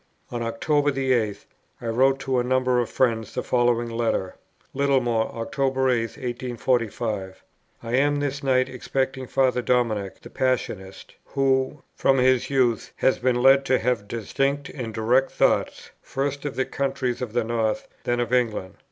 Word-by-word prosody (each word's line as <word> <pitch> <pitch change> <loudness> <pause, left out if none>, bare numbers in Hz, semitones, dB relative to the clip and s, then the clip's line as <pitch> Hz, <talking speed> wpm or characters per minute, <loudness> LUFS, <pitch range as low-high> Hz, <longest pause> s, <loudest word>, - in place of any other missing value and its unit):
On 120 -1 -3
October 145 +6 +1
the 135 -2 0
8th 110 -5 0 0.3
I - - -9
wrote 130 +4 +2
to 130 -2 0
a - - +1
number 130 0 +2
of 120 - -1
friends 115 -4 0
the - - -1
following 120 -1 +2
letter: 115 -5 -1 0.4
"Littlemore, 130 -5 +1
October 130 +3 0
8th, 115 -2 -1
1845. 120 -6 -2 0.4
I 115 0 -5
am 145 +2 +3
this 145 0 -2
night 130 -2 +2
expecting 130 0 -3
Father 130 -1 +2
Dominic, 110 -5 0
the - - -12
Passionist, 110 -7 -2
who, 135 +1 0
from 135 - +3
his 130 -1 +3
youth, 125 -4 +1
has 130 - +2
been 125 -1 +1
led 135 +1 +6
to 130 - +3
have 115 -4 -1
distinct 135 +6 -1
and 120 -5 -5
direct 120 +5 +2
thoughts, - - 0
first 140 +1 -3
of 145 - -3
the 130 - 0
countries 130 -3 -2
of 120 -4 -4
the 120 -1 +1
North, 110 -1 -1 0.2
then 120 0 0
of 120 0 -1
England. 110 -7 0
125 Hz, 160 wpm, -24 LUFS, 115-135 Hz, 0.4 s, led